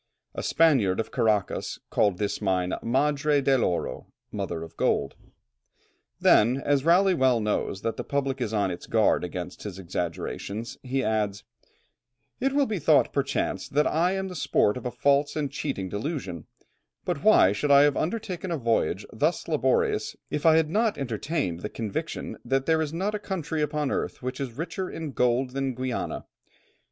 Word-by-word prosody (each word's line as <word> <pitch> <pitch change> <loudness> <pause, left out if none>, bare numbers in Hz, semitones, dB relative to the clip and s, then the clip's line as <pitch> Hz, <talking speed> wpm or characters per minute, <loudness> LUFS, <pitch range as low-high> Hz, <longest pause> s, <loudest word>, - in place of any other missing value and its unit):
A - - -4
Spaniard 130 - +3
of 115 - -2
Caracas 110 -5 0
called 100 -4 +2
this 105 +1 -2
mine 95 -2 0
Madre 145 +4 +2
del 135 -2 +2
Oro 85 -7 -2 0.2
(mother 80 - -4
of 80 - -11
gold)." - - 0 1.0
Then, 120 +5 +5
as 140 0 +1
Raleigh 185 +4 +5
well 130 -7 +3
knows 105 -2 -2
that 115 - -2
the - - -3
public 135 -2 -2
is 110 - -1
on 100 -4 +1
its 85 - -7
guard 110 -4 +3
against 90 0 -6
his 100 -3 -6
exaggerations, 95 +4 -4
he 130 +1 -1
adds, 105 -2 -1 1.0
"It 270 +2 +1
will 280 0 +3
be 215 -6 -2
thought 155 0 +4
perchance, 140 -1 -1
that 150 +2 +2
I 170 +4 +2
am 190 0 -2
the 185 - -7
sport 140 -8 +2
of 125 0 -4
a - - -1
false 140 +2 +2
and 145 -3 -2
cheating 135 -9 -3
delusion, 100 - -4 0.6
but - - -2
why 95 - +6
should 125 +9 -1
I 140 0 +8
have 145 -1 +3
undertaken 190 0 -3
a 170 - -1
voyage 115 - 0
thus 155 +9 0
laborious, 145 -5 +1 0.2
if 150 +2 0
I 160 - +7
had 160 -1 +2
not 220 +2 +1
entertained 125 - -2
the 105 - -5
conviction 110 -3 -4
that 135 +2 0
there 160 -1 +2
is 150 -2 -2
not 190 +6 -2
a 210 - -2
country 170 -6 -3
upon 150 -1 -1
earth - - -3
which 130 +1 -4
is 135 -4 -4
richer 175 +7 -4
in 160 -3 -5
gold 125 0 +1
than 135 -1 -2
Guiana? 130 -1 -3
135 Hz, 175 wpm, -26 LUFS, 105-155 Hz, 1.0 s, I